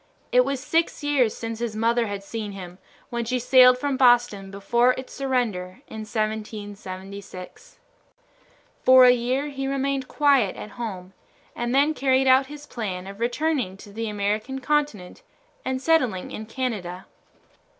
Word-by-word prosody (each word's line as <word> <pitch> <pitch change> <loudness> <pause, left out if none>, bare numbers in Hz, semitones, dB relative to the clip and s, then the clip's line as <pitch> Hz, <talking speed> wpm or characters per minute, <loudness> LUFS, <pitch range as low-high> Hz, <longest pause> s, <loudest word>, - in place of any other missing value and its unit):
It 250 - +5
was 275 0 -2
six 325 +3 0
years 275 -6 +2
since 225 -1 -5
his 235 -2 -3
mother 230 +1 +1
had 200 -1 -5
seen 210 0 -5
him, 180 -1 -9 0.3
when 235 0 -2
she 250 +2 -1
sailed 250 0 +6
from 275 0 -1
Boston 240 -6 +3
before 235 +6 +2
its 260 0 -8
surrender 245 -6 -2
in 220 -1 -7
1776. 205 - -6 1.0
For 255 0 +8
a 250 - +8
year 250 +4 0
he 270 -1 -4
remained 275 -1 -1
quiet 280 -9 +3
at 210 - -8
home, 190 -6 -6 0.4
and 240 +1 -2
then 290 +3 +4
carried 265 -2 +2
out 260 +1 +5
his 295 +1 -10
plan 190 -9 -5
of 200 +1 -9
returning 245 -4 -1
to 205 0 -13
the 225 +1 -3
American 210 +5 -2
continent 275 - -1 0.4
and 260 0 -2
settling 255 - +1
in 220 - -7
Canada. 210 -8 -4
240 Hz, 150 wpm, -24 LUFS, 205-265 Hz, 1.0 s, For